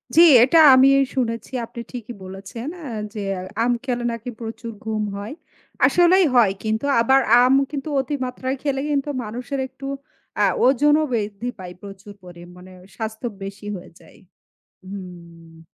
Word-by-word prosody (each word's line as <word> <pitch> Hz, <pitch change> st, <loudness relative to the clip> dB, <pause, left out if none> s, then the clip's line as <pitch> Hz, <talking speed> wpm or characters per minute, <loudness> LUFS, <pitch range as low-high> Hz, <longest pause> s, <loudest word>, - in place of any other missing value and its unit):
জ্বি, 335 Hz, -, +8 dB, 0.2 s
এটা 275 Hz, +6 st, +3 dB, 0.2 s
আমি 260 Hz, +1 st, +6 dB, 0.3 s
শুনেছি। 230 Hz, -3 st, -2 dB
আপনি 235 Hz, -, -11 dB
ঠিকই 240 Hz, -1 st, -7 dB
বলেছেন 195 Hz, +7 st, -8 dB, 0.2 s
এ -, -, -8 dB, 0.3 s
যে 215 Hz, -, -6 dB, 0.4 s
আম 245 Hz, -, +2 dB
খেলে 245 Hz, -2 st, -2 dB
নাকি 230 Hz, +1 st, -6 dB
প্রচুর 230 Hz, +1 st, -6 dB
ঘুম 215 Hz, -1 st, -2 dB
হয়। 205 Hz, +5 st, -6 dB, 0.5 s
আসলেই 355 Hz, +2 st, +4 dB
হয় 230 Hz, -5 st, +5 dB
কিন্তু 220 Hz, +4 st, -1 dB, 0.2 s
আবার 265 Hz, +4 st, +4 dB, 0.2 s
আম 255 Hz, +1 st, +4 dB, 0.2 s
কিন্তু 290 Hz, +1 st, -5 dB
অতিমাত্রায় 260 Hz, -1 st, -4 dB
খেলে 275 Hz, -2 st, -1 dB
কিন্তু 285 Hz, 0 st, -1 dB
মানুষের 245 Hz, +5 st, -5 dB
একটু 275 Hz, +1 st, -12 dB, 0.6 s
আ -, -, +5 dB, 0.2 s
ওজনও 295 Hz, +4 st, +4 dB
বৃদ্ধি 210 Hz, 0 st, -3 dB
পায়। 180 Hz, -1 st, -8 dB
প্রচুর 200 Hz, 0 st, -11 dB, 0.4 s
মানে 185 Hz, +1 st, -14 dB, 0.2 s
স্বাস্থ্য 220 Hz, +1 st, -5 dB, 0.2 s
বেশি 200 Hz, +1 st, -8 dB
হয়ে 180 Hz, -, -11 dB
যায়। -, -, -19 dB, 0.7 s
হুম। 170 Hz, -4 st, -11 dB
230 Hz, 140 wpm, -22 LUFS, 200-265 Hz, 0.7 s, জ্বি